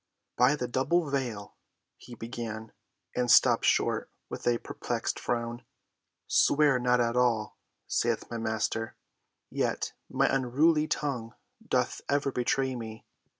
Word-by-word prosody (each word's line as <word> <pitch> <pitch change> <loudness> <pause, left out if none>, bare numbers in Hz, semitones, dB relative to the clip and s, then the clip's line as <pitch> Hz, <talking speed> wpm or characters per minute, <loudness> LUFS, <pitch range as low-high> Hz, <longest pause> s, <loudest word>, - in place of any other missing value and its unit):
"By 125 +4 +4
the 125 -4 -3
double 140 +5 +1
veil—" 120 -7 -3 0.4
he 120 - -12
began, 115 -2 -6 0.4
and 125 -1 0
stopped - - +6
short - - +2 0.2
with - - -6
a 120 -1 +3
perplexed - - -3
frown. 120 0 -3 0.6
"'Swear 145 -3 +4
not 125 0 +2
at 115 0 +1
all,' 120 -4 +1 0.3
saith 115 -1 0
my 115 - -3
Master, 110 0 -2 0.6
yet - - -1 0.2
my - - +2
unruly 150 +5 +2
tongue 125 -7 -3 0.3
doth 125 - 0
ever 140 -1 +1
betray 130 +1 0
me. 110 -2 -8
125 Hz, 125 wpm, -29 LUFS, 115-135 Hz, 0.6 s, stopped